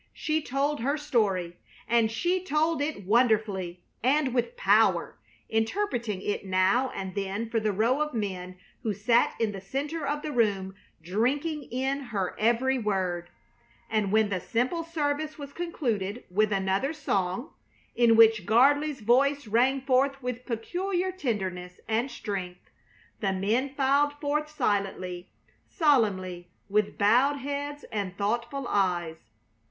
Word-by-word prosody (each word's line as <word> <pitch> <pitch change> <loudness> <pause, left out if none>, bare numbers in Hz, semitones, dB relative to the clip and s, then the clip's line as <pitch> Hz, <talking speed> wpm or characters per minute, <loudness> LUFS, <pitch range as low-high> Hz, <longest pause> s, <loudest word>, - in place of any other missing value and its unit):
She 315 0 -1
told 285 +2 -1
her 280 +6 0
story, 200 - 0 0.3
and 230 -1 +3
she 350 +11 0
told 315 -2 +1
it 290 -8 -3
wonderfully 205 -6 +1 0.2
and 265 +1 +2
with 260 - -1
power, - - +3 0.3
interpreting 225 - -1
it 205 - -2
now 190 +7 +2
and 190 -1 -5
then 200 +3 -3
for 230 - +2
the 215 -1 0
row 230 +8 +1
of 300 0 0
men 185 -5 -4 0.2
who 215 -3 -2
sat 230 +4 +2
in 225 -2 +1
the 195 -2 -7
center 285 - -3
of 295 +1 -2
the 305 - -3
room 200 -6 +1 0.3
drinking 275 - -1
in 265 +3 -1
her 200 -6 -3
every 240 +4 +2
word; 185 -5 -1 0.6
and 215 -3 +1
when 220 -1 +3
the 185 -2 -1
simple 255 - -1
service 310 -2 -2
was 285 -1 -8
concluded 240 - -2
with 210 +3 +2
another 195 +8 0
song, 240 - -2 0.4
in 235 -1 +5
which 225 -4 +6
Gardley's 280 +5 +3
voice 275 +5 +3
rang 250 +5 +2
forth 270 +1 +2
with 250 0 -4
peculiar 355 - -2
tenderness 190 - -3
and 225 +4 0
strength, 190 -7 -6 0.5
the 195 -2 0
men 230 +9 0
filed 280 +2 +3
forth 295 +1 -2
silently, 190 -9 -2 0.4
solemnly, 190 - +1 0.2
with 210 0 +1
bowed 250 +8 +4
heads 285 +1 -4
and 200 -3 -3
thoughtful 235 +6 -2
eyes. 175 -5 0
235 Hz, 135 wpm, -27 LUFS, 200-285 Hz, 0.6 s, which